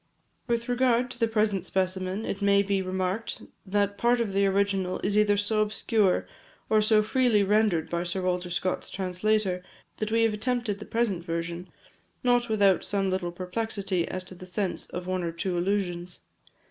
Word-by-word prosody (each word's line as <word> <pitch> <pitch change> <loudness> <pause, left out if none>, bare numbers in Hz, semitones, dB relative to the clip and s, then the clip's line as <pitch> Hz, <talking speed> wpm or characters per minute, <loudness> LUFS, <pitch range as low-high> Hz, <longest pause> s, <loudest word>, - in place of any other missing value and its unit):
With 235 -1 0
regard 245 0 +2
to 240 - -10
the 230 - +3
present 210 -4 +1
specimen, 185 +2 -1
it 200 - -4
may 200 0 +4
be 200 -1 0
remarked, 185 +3 -2 0.2
that 200 0 0
part 240 +2 +3
of 220 -4 -1
the 200 0 +3
original 195 -1 +1
is 200 +1 0
either 210 -1 +4
so 215 +1 +1
obscure, 210 -2 +1 0.5
or 215 -1 +5
so 215 0 +4
freely 225 -2 +3
rendered 200 -5 +2
by 170 0 -2
Sir 180 +2 -3
Walter 180 -1 -1
Scott's 175 +1 -2
translator, 190 0 0 0.4
that 215 0 -3
we 230 0 +3
have 225 -1 +2
attempted 225 -2 -1
the 210 - -8
present 220 -7 0
version, 170 +1 -4 0.6
not 245 -1 +3
without 200 -4 +3
some 195 -2 0
little 185 -2 -1
perplexity 190 0 -2
as 185 0 -4
to 185 - -11
the 185 0 -11
sense 190 0 -3
of 180 0 -6
one 185 0 -1
or 170 -1 -2
two 175 +2 -3
allusions. 175 -1 -2
200 Hz, 175 wpm, -27 LUFS, 185-215 Hz, 0.6 s, or